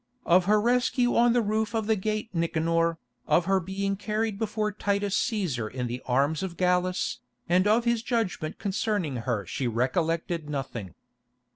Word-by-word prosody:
Of 175 +1 +4
her 210 +2 +4
rescue 245 +2 +2
on 235 0 +5
the 240 -1 +3
roof 220 +2 -1
of 220 -1 0
the 220 +1 +2
Gate 215 +2 -2
Nicanor, 165 0 +1 0.3
of 170 - +3
her 195 +1 +3
being 195 +2 -2
carried 215 +1 -2
before 215 -1 -1
Titus 200 -1 -1
Cæsar 175 - -1
in 125 +1 -4
the 120 +1 -4
arms 140 +5 +1
of 185 -3 -5
Gallus, 180 0 +1 0.3
and 185 +3 +3
of 225 +3 +3
his 235 -1 +2
judgment 225 -10 -2
concerning 200 - -1
her 115 -4 -2
she 125 +8 -2
recollected 160 +6 -1
nothing. 125 -9 -5
190 Hz, 160 wpm, -27 LUFS, 160-215 Hz, 0.3 s, on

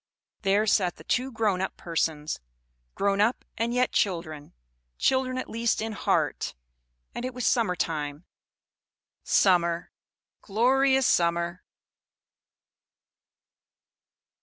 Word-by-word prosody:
There 200 +1 +2
sat 190 -4 +2
the - - -14
two 255 +2 0
grown 215 -5 0
up 190 - -3
persons; 160 -3 -2 0.6
grown 200 0 +1
up, 225 +4 +1
and 230 +1 -1
yet 250 +1 +1
children; 155 - -2 0.4
children 260 - +1
at 255 - -3
least 230 +1 0
in 220 +1 -2
heart; 215 - -1 0.6
and - - -5
it 255 -1 -4
was 250 - -3
summer 225 -7 +2
time; 150 -1 -3 1.0
summer, 170 -2 +2 0.5
glorious 265 +5 +3
summer! 170 -1 +1
200 Hz, 105 wpm, -27 LUFS, 170-240 Hz, 1.0 s, glorious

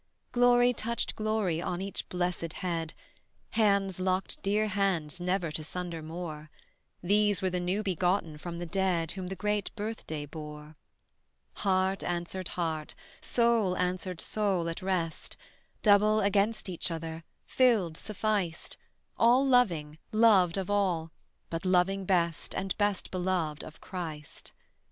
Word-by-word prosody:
Glory 245 0 +5
touched 235 0 -2
glory 215 -6 0
on 180 -1 -2
each 195 +1 -4
blessed 175 -2 -2
head, 165 -4 -3 0.6
Hands 200 -4 +2
locked 185 0 -1
dear 210 +2 +1
hands 185 -6 0
never 180 -2 0
to 155 0 -4
sunder 170 0 -5
more: 155 -1 -6 0.5
These 205 +1 +3
were 185 - +1
the 180 - -1
new 185 +4 -1
begotten 180 -4 0
from 170 +1 -6
the 175 - -4
dead 175 -2 0
Whom 190 -2 -5
the 190 - -4
great 210 +1 -1
birthday 205 -9 -4
bore. 150 0 -9 0.8
Heart 190 -1 +1
answered 175 +1 -3
heart, 160 -3 -2 0.3
soul 230 -6 +2
answered 180 -1 -2
soul 195 -5 0
at 165 - -5
rest, 180 -4 -2 0.5
Double 210 +1 +5
against 205 +2 +1
each 180 -1 -1
other, 165 0 -5 0.2
filled, 220 -11 +3
sufficed: 205 -4 -2 0.4
All 245 +4 +5
loving, 170 - +2
loved 205 -6 +5
of 190 -2 -2
all; 180 -6 +1 0.4
but 165 0 -3
loving 190 +1 +2
best 170 -4 0
And 190 -1 -2
best 205 -2 0
beloved 180 -5 -1
of 155 - -11
Christ. 160 -5 -7
185 Hz, 130 wpm, -30 LUFS, 165-205 Hz, 0.8 s, Glory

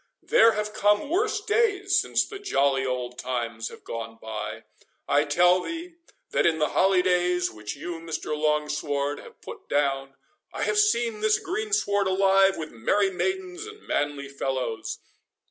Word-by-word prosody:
There 225 0 +5
have 210 0 -3
come 210 +7 +2
worse 425 +4 +1
days 415 -2 +2
since - - +1
the 400 - -8
jolly 140 - +1
old 125 -1 -3
times 115 -3 -3
have - - -13
gone 115 0 -6
by:—I 110 +6 -3
tell 175 +5 +4
thee, 330 - -6 0.3
that - - +2
in 165 -1 +2
the 155 -1 +1
holydays 180 -1 +2
which 105 -1 -7
you, 165 +4 -6
Mr. 165 -2 -4
Longsword, 150 -1 -1
have - - -14
put - - -10
down, 135 -1 0 0.4
I - - -3
have 425 - +2
seen 235 - +2
this 215 0 +3
greensward 390 - 0
alive 195 0 +4
with 155 -1 -6
merry 195 - +1
maidens 375 - -3
and 430 0 -12
manly 145 -1 -1
fellows. 130 -4 -3
180 Hz, 145 wpm, -26 LUFS, -, 0.4 s, There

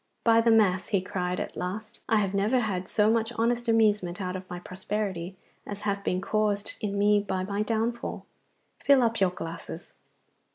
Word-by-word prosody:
'By 230 0 +5
the 230 - +3
Mass,' 200 -5 +3
he 200 - +2
cried 180 -1 -3
at - - -5
last, 210 +4 -5
'I 225 - +4
have 200 -2 +1
never 215 +6 +2
had 185 -5 -3
so 215 0 +3
much 225 0 +1
honest 240 +1 0
amusement 210 -5 +2
out 185 -1 -3
of 185 0 -7
my 180 - -5
prosperity 190 0 -4 0.3
as 205 0 -6
hath 200 -1 -2
been 185 -1 0
caused 210 0 0
in 200 -1 -2
me 205 +1 +4
by 190 -2 -2
my 200 +2 -2
downfall. 225 +2 -2 0.5
Fill 275 -3 +5
up 230 -1 +1
your 190 -2 +4
glasses! 165 -2 -8
205 Hz, 180 wpm, -27 LUFS, 185-225 Hz, 0.5 s, By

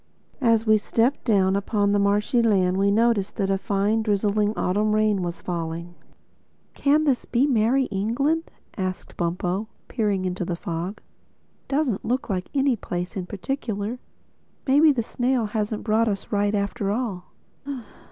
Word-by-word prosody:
As 230 -3 +3
we 215 -1 +5
stepped 235 +6 0
down 195 -4 +3
upon 200 0 +1
the 205 - +3
marshy 205 +4 +2
land 190 -5 +2
we 200 +1 +3
noticed 220 -1 +2
that 195 -3 0
a 195 - +2
fine, 205 +3 +1
drizzling 210 0 +1
autumn 210 +3 +1
rain 215 -2 +2
was 175 -1 -4
falling. 170 0 -4 0.8
"Can 295 +2 +3
this 275 -5 +1
be 250 +3 +2
Merrie 255 0 +2
England?" 275 +11 0 0.3
asked 185 -1 -4
Bumpo, 180 +4 -1 0.2
peering 205 -5 0
into 180 0 -2
the 175 0 -2
fog—"doesn't 200 - -5
look 250 0 -1
like 185 -1 -2
any 270 -2 +3
place 180 -2 -5
in 185 -2 -4
particular. 215 +1 -3 0.7
Maybe 290 +3 +6
the 245 -5 0
snail 245 +1 0
hasn't 210 0 -2
brought 225 +1 +2
us 200 -2 -3
right 205 0 +1
after 200 +1 -1
all." 205 -5 -2
210 Hz, 145 wpm, -24 LUFS, 195-235 Hz, 0.8 s, Maybe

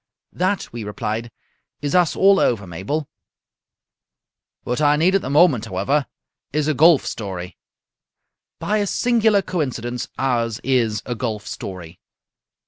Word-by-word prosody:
"That," 185 -3 -1
we 120 -2 -5
replied, 110 +3 -4 0.5
"is 145 - -1
us 180 -3 +3
all 195 0 +5
over, 105 -5 +1
Mabel." 100 - -4 1.6
"What 125 +4 -2
I 145 0 +4
need 170 +5 +3
at 195 - +3
the - - -5
moment, 145 -6 +4
however, 115 +9 0 0.4
is 150 +1 0
a 155 - +2
golf 155 +2 +5
story." 90 -4 -5 1.0
"By 215 +1 0
a 205 - 0
singular 220 -3 +2
coincidence, 125 -9 -3
ours 115 -4 0
is 115 -6 +1
a 125 - -2
golf 110 -3 -4
story." 90 -5 -8
130 Hz, 135 wpm, -21 LUFS, 105-165 Hz, 1.6 s, all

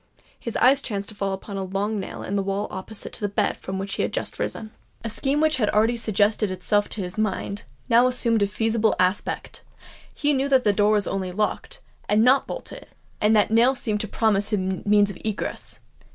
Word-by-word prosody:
His 230 - -6
eye 255 +2 +6
chanced 205 -8 -4
to - - -10
fall 200 -1 -2
upon 195 +1 -6
a 195 - -2
long 200 +3 -2
nail 190 - -6
in 200 - -3
the 200 - +1
wall 195 +1 -2
opposite 200 +3 -6
to - - -6
the 205 - +1
bed 205 +1 0
from 190 0 -5
which 195 +1 -4
he - - -1
had - - -1
just - - -4
risen. 220 -1 -4 0.3
A 230 - -3
scheme 275 +5 0
which 310 -1 +2
had 215 -5 +1
already 220 +3 +3
suggested 215 -2 +1
itself 205 +3 0
to 210 - -3
his 180 +3 -6
mind, 200 -1 -2 0.2
now 240 +2 +5
assumed 235 -3 +1
a 200 - +3
feasible 225 +1 +1
aspect:—he 205 +9 -3
knew 275 +1 0
that 265 -2 +4
the 205 - +3
door 205 +1 +3
was 210 -1 +2
only 190 -2 -2
locked, 215 - -2 0.3
and 210 +2 +4
not 260 +3 +4
bolted; - - -7 0.3
and 215 +1 +4
that 210 0 +3
nail 240 +4 +4
seemed 215 -4 -2
to 215 - -3
promise 205 -2 +1
the 210 - +1
means 200 +2 +2
of 190 - -11
egress. 215 -2 -4
210 Hz, 210 wpm, -24 LUFS, 200-230 Hz, 0.3 s, eye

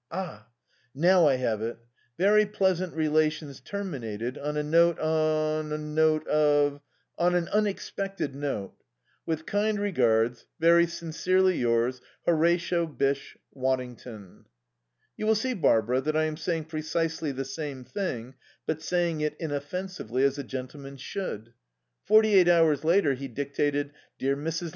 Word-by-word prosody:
"Ah 155 - -6 0.5
now 175 +2 +5
I 135 - +4
have 115 -4 -1
it. 115 +1 -3 0.4
'Very 210 +3 +5
pleasant 185 -4 0
relations 155 -2 0
terminated 125 - -5
on 150 +1 -4
a 150 - 0
note 170 +2 +4
on 155 -1 0
a 150 - -1
note 155 +1 +1
of 145 -1 +2 0.4
on 175 +1 +3
an 175 -1 +1
unexpected 195 -5 -2
note. 135 -9 -4 0.5
"'With 160 -1 -2
kind 210 +1 0
regards, 120 - +1
very 170 +1 +5
sincerely 180 +3 +1
yours, 120 +1 +1 0.2
"'HORATIO 170 +1 +2
BYSSHE 140 -2 -2 0.2
WADDINGTON.' 125 -6 -4 0.7
"You 215 - -2
will 220 - +4
see, 255 +4 -1
Barbara, 125 - +2
that 155 +3 -1
I 155 - +3
am 155 -1 -1
saying 165 0 -2
precisely 160 0 -2
the 135 0 -4
same 140 -2 -6
thing, 130 - -4 0.3
but 160 0 -2
saying 170 -2 0
it 150 0 -1
inoffensively, 145 - -3
as 140 +1 +2
a - - -3
gentleman 135 +2 -7
should." 120 - -6 0.5
Forty 215 0 +5
eight 185 -3 +6
hours 165 -4 +4
later 165 -3 +3
he 135 +1 -5
dictated: 145 +2 -1 0.3
"'DEAR 135 +1 0
MRS. 165 +4 -3
155 Hz, 140 wpm, -27 LUFS, 135-170 Hz, 0.7 s, eight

